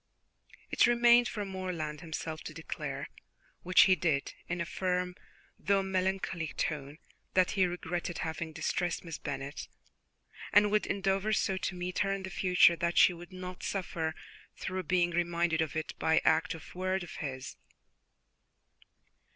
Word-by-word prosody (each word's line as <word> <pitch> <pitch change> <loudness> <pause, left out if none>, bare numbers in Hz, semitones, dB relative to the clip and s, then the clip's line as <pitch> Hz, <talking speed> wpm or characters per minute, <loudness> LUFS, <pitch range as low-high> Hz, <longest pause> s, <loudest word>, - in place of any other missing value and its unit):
It - - +5
remained 240 0 +6
for 205 -1 -4
Morland 180 -6 -4
himself 160 -1 -5
to 155 - -7
declare, 165 - -5 0.5
which 185 +1 +5
he 190 - +6
did 155 -4 0
in 175 0 -2
a 170 - -1
firm 180 0 -1 0.5
though 200 -1 +2
melancholy 190 -3 -1
tone, 145 -1 -2 0.4
that 185 -1 +4
he 190 -3 +3
regretted 175 -1 -3
having 160 0 -4
distressed 175 +2 -2
Miss 165 -2 -6
Bennet, 140 0 -5 0.8
and 205 0 +5
would 210 0 +2
endeavour 195 +2 0
so 195 -2 +1
to 185 - -3
meet 180 0 -3
her 195 - +2
in 195 -1 -2
the 190 - -6
future 180 -2 +5
that 170 +1 -1
she 180 - +7
would 175 +2 -11
not 185 0 -7
suffer 165 -5 -2 0.4
through 185 0 -3
being 175 -1 +3
reminded 170 -1 +1
of 155 -3 -2
it 155 0 -3
by 160 - +2
any - - +3
act 165 +2 +3
of 160 - -12
word 185 +1 -1
of 175 - -9
his. 130 -3 -5
180 Hz, 155 wpm, -31 LUFS, 160-190 Hz, 0.8 s, she